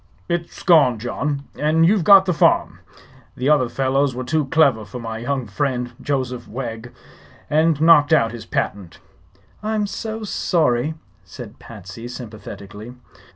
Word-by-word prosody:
"It's 170 Hz, -1 st, -4 dB
gone, 155 Hz, -9 st, +5 dB
John; 140 Hz, +5 st, -3 dB
and 160 Hz, +2 st, +2 dB
you've 195 Hz, +1 st, +3 dB
got 195 Hz, +1 st, +7 dB
the 180 Hz, -, +1 dB
farm. -, -, +2 dB, 0.6 s
The 130 Hz, +3 st, 0 dB
other 140 Hz, -5 st, +3 dB
fellows 135 Hz, 0 st, 0 dB
were 130 Hz, -, -4 dB
too 150 Hz, +3 st, 0 dB
clever 135 Hz, -6 st, +3 dB
for 125 Hz, -, -9 dB
my 115 Hz, -2 st, -6 dB
young 130 Hz, +1 st, -2 dB
friend, 125 Hz, +2 st, -2 dB
Joseph 130 Hz, -3 st, -3 dB
Wegg, 115 Hz, -1 st, -6 dB, 0.6 s
and 155 Hz, 0 st, +2 dB
knocked 155 Hz, -2 st, +5 dB
out 115 Hz, -8 st, +3 dB
his 120 Hz, -1 st, -9 dB
patent." 95 Hz, -4 st, -3 dB, 0.6 s
"I'm 215 Hz, 0 st, -1 dB
so 220 Hz, +2 st, -5 dB
sorry!" 155 Hz, -, 0 dB, 0.3 s
said -, -, -11 dB
Patsy, 105 Hz, +1 st, -10 dB
sympathetically. 110 Hz, -1 st, -9 dB
135 Hz, 140 wpm, -21 LUFS, 120-160 Hz, 0.6 s, got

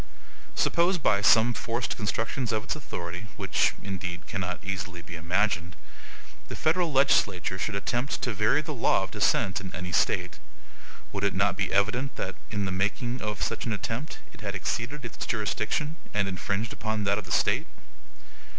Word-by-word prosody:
Suppose, 175 Hz, +2 st, +3 dB
by 100 Hz, -10 st, +3 dB
some 115 Hz, +3 st, +6 dB
forced 115 Hz, +2 st, -2 dB
constructions 115 Hz, +4 st, -1 dB
of 110 Hz, -1 st, 0 dB
its -, -, -2 dB
authority 90 Hz, -, -5 dB
(which, -, -, +2 dB
indeed, 95 Hz, -3 st, -4 dB
cannot 90 Hz, -2 st, -2 dB
easily 95 Hz, -3 st, -4 dB
be 90 Hz, -, -8 dB
imagined), 85 Hz, +1 st, 0 dB, 0.7 s
the -, -, -5 dB
Federal 165 Hz, +1 st, +2 dB
legislature 105 Hz, -10 st, +3 dB
should 105 Hz, +2 st, -1 dB
attempt 120 Hz, +7 st, -1 dB
to 125 Hz, -, 0 dB
vary 105 Hz, +9 st, +3 dB
the 155 Hz, 0 st, -4 dB
law 120 Hz, -6 st, +3 dB
of 95 Hz, -, -5 dB
descent 95 Hz, +1 st, +2 dB
in 95 Hz, -, -6 dB
any 90 Hz, 0 st, -4 dB
State, 90 Hz, 0 st, +1 dB, 0.7 s
would 100 Hz, -1 st, -3 dB
it 100 Hz, -, +2 dB
not 100 Hz, -1 st, +3 dB
be 95 Hz, -1 st, -1 dB
evident 115 Hz, +8 st, +1 dB
that, -, -, -3 dB, 0.2 s
in 105 Hz, -2 st, -1 dB
making 120 Hz, +6 st, -1 dB, 0.2 s
such -, -, -2 dB
an 115 Hz, -, +1 dB
attempt, 115 Hz, +8 st, -3 dB, 0.2 s
it 115 Hz, -, -13 dB
had 100 Hz, -1 st, -3 dB
exceeded 125 Hz, +8 st, -2 dB
its 120 Hz, -, -5 dB
jurisdiction, 110 Hz, -, -1 dB, 0.2 s
and 100 Hz, -1 st, +2 dB
infringed 100 Hz, +3 st, -2 dB
upon 110 Hz, -1 st, -2 dB
that 100 Hz, +1 st, +2 dB
of 105 Hz, -, -8 dB
the 90 Hz, -, -9 dB
State? -, -, +3 dB
105 Hz, 165 wpm, -28 LUFS, 95-120 Hz, 0.7 s, some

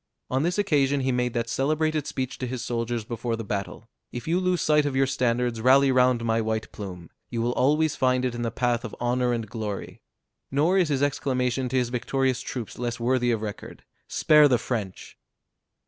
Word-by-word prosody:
On 130 Hz, +1 st, +1 dB
this 175 Hz, +4 st, 0 dB
occasion 145 Hz, -8 st, +2 dB
he 130 Hz, 0 st, 0 dB
made 125 Hz, -1 st, -1 dB
that 115 Hz, -1 st, -1 dB
celebrated 155 Hz, +4 st, 0 dB
speech 130 Hz, -1 st, -4 dB
to 130 Hz, -, -3 dB
his 125 Hz, -1 st, -4 dB
soldiers 115 Hz, -1 st, -2 dB
before 115 Hz, 0 st, -3 dB
the 115 Hz, -, -5 dB
battle: 100 Hz, +2 st, -5 dB, 0.2 s
"If 120 Hz, -, -7 dB
you 170 Hz, +3 st, +2 dB
lose 185 Hz, -1 st, +1 dB
sight 150 Hz, -1 st, +4 dB
of 145 Hz, -2 st, -2 dB
your 135 Hz, 0 st, +3 dB
standards, 120 Hz, -3 st, 0 dB
rally 135 Hz, +3 st, +5 dB
round 125 Hz, -2 st, +3 dB
my 115 Hz, 0 st, +1 dB
white 110 Hz, 0 st, -2 dB
plume; 90 Hz, -5 st, -8 dB, 0.2 s
you 120 Hz, -, -3 dB
will 120 Hz, +1 st, +1 dB
always 150 Hz, +4 st, +2 dB
find 130 Hz, 0 st, +2 dB
it 125 Hz, -, -1 dB
in 120 Hz, -, -5 dB
the 115 Hz, -, 0 dB
path 120 Hz, 0 st, 0 dB
of -, -, -6 dB
honor 125 Hz, +1 st, +1 dB
and 115 Hz, -2 st, -2 dB
glory." 105 Hz, -2 st, -6 dB, 0.5 s
Nor 160 Hz, +8 st, +2 dB
is 175 Hz, -4 st, +2 dB
his 140 Hz, -1 st, +1 dB
exclamation 130 Hz, -2 st, 0 dB
to 130 Hz, -, -3 dB
his 125 Hz, -2 st, +1 dB
victorious 130 Hz, +1 st, 0 dB
troops 120 Hz, -4 st, -6 dB
less 120 Hz, 0 st, -3 dB
worthy 125 Hz, +1 st, +1 dB
of 115 Hz, -2 st, 0 dB
record: 105 Hz, -1 st, -7 dB, 0.2 s
"Spare 150 Hz, -1 st, +5 dB
the 125 Hz, -3 st, +3 dB
French!" 110 Hz, -5 st, -5 dB
125 Hz, 200 wpm, -25 LUFS, 115-135 Hz, 0.5 s, rally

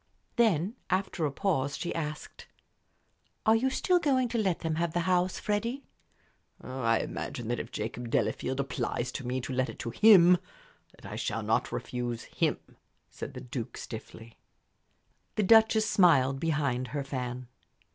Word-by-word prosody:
Then, 215 Hz, -, +2 dB
after 185 Hz, -4 st, 0 dB
a -, -, -4 dB
pause, 140 Hz, -5 st, -1 dB
she 175 Hz, -, -3 dB
asked, 150 Hz, -2 st, -6 dB, 1.0 s
"Are 220 Hz, -, +6 dB
you 255 Hz, +4 st, +2 dB
still 355 Hz, +7 st, +2 dB
going 260 Hz, -6 st, +2 dB
to 235 Hz, 0 st, -1 dB
let 190 Hz, -5 st, 0 dB
them 160 Hz, -1 st, -1 dB
have 170 Hz, -1 st, -1 dB
the 175 Hz, -, +1 dB
house, 180 Hz, +1 st, +1 dB
Freddie?" 230 Hz, +6 st, -2 dB, 0.8 s
"I 125 Hz, -3 st, 0 dB
imagine 120 Hz, -2 st, -5 dB
that 120 Hz, -, -1 dB
if -, -, -5 dB
Jacob 115 Hz, +2 st, -5 dB
Delafield 130 Hz, +2 st, 0 dB
applies 125 Hz, -2 st, -2 dB
to 130 Hz, -1 st, -6 dB
me 130 Hz, +1 st, -1 dB
to 130 Hz, +2 st, -5 dB
let 130 Hz, 0 st, 0 dB
it -, -, -8 dB
to 115 Hz, -, -4 dB
him, 180 Hz, -, +7 dB, 0.6 s
that -, -, -17 dB
I -, -, -6 dB
shall -, -, -2 dB
not -, -, 0 dB
refuse 120 Hz, -2 st, -4 dB
him," -, -, -2 dB, 0.3 s
said -, -, -7 dB
the 125 Hz, -, -6 dB
Duke, 125 Hz, -2 st, -6 dB
stiffly. 110 Hz, 0 st, -9 dB, 1.0 s
The 215 Hz, -, +1 dB
Duchess 220 Hz, +1 st, +5 dB
smiled 140 Hz, -10 st, +4 dB
behind 140 Hz, -5 st, 0 dB
her 145 Hz, 0 st, -3 dB
fan. 125 Hz, -2 st, -5 dB
150 Hz, 155 wpm, -29 LUFS, 125-200 Hz, 1.0 s, him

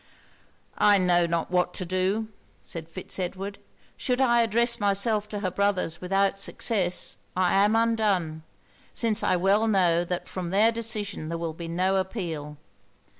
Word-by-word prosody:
'I 205 Hz, -1 st, +6 dB
know 175 Hz, -2 st, +3 dB
not 170 Hz, 0 st, -2 dB
what 180 Hz, -1 st, +1 dB
to 185 Hz, -, -3 dB
do,' 190 Hz, +5 st, 0 dB, 0.4 s
said 165 Hz, -1 st, -8 dB
Fitz 185 Hz, +3 st, -5 dB
Edward. 195 Hz, +2 st, -4 dB, 0.4 s
'Should 250 Hz, -2 st, -1 dB
I 240 Hz, -3 st, +4 dB
address 235 Hz, +1 st, +2 dB
myself 205 Hz, +1 st, +1 dB
to 205 Hz, -1 st, -4 dB
her 185 Hz, -3 st, -1 dB
brothers 190 Hz, -4 st, 0 dB
without 195 Hz, +2 st, +1 dB
success, 190 Hz, -4 st, -1 dB, 0.2 s
I 185 Hz, -1 st, +2 dB
am 205 Hz, +3 st, +4 dB
undone; 210 Hz, -9 st, +1 dB, 0.5 s
since 225 Hz, -3 st, +1 dB
I -, -, +2 dB
well 195 Hz, +5 st, +2 dB
know 175 Hz, -5 st, +3 dB
that 175 Hz, 0 st, -4 dB
from 180 Hz, -2 st, -5 dB
their 210 Hz, +5 st, +4 dB
decision 215 Hz, -7 st, -3 dB
there 165 Hz, -, -3 dB
will 165 Hz, -1 st, -3 dB
be 165 Hz, +1 st, -7 dB
no 185 Hz, +3 st, +1 dB
appeal. 165 Hz, -7 st, -4 dB
195 Hz, 155 wpm, -26 LUFS, 175-210 Hz, 0.5 s, I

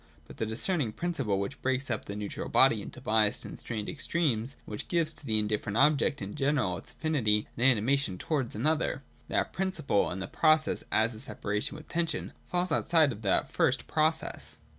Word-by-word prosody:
But -, -, -13 dB
the 110 Hz, -, -1 dB
discerning 120 Hz, -, -1 dB
principle, 135 Hz, -, -1 dB
which 125 Hz, +9 st, -4 dB
breaks 130 Hz, 0 st, 0 dB
up 110 Hz, -, -2 dB
the 100 Hz, -, -6 dB
neutral 105 Hz, -1 st, -5 dB
body 115 Hz, -5 st, +5 dB
into 115 Hz, -, -8 dB
biassed 110 Hz, -4 st, +2 dB
and -, -, -7 dB
strained 110 Hz, -3 st, -4 dB
extremes, 135 Hz, -7 st, -1 dB
and -, -, -15 dB
which 105 Hz, -, -5 dB
gives 170 Hz, -3 st, +1 dB
to -, -, -13 dB
the 110 Hz, -5 st, +1 dB
indifferent 105 Hz, 0 st, -1 dB
object 145 Hz, -2 st, +3 dB
in 100 Hz, +1 st, -6 dB
general 135 Hz, -10 st, +1 dB
its -, -, -10 dB
affinity 125 Hz, -8 st, +1 dB
and 120 Hz, -, -2 dB
anima 130 Hz, +2 st, +4 dB
tion 100 Hz, -10 st, -2 dB
towards 135 Hz, -, -1 dB
another; 150 Hz, +3 st, 0 dB
— -, -, -31 dB
that -, -, 0 dB
principle, 185 Hz, -, 0 dB
and 90 Hz, -, -4 dB
the 95 Hz, -, -4 dB
process 155 Hz, -1 st, +2 dB
as 110 Hz, +2 st, +2 dB
a 110 Hz, -, -10 dB
separation 105 Hz, -4 st, -3 dB
with 155 Hz, -, -12 dB
tension, 170 Hz, -1 st, -2 dB, 0.2 s
falls 180 Hz, +1 st, 0 dB
outside 160 Hz, -4 st, +3 dB
of 110 Hz, -2 st, -8 dB
that 100 Hz, -3 st, +1 dB
first -, -, +1 dB
process. 160 Hz, +1 st, -1 dB
130 Hz, 195 wpm, -29 LUFS, 105-155 Hz, 0.2 s, body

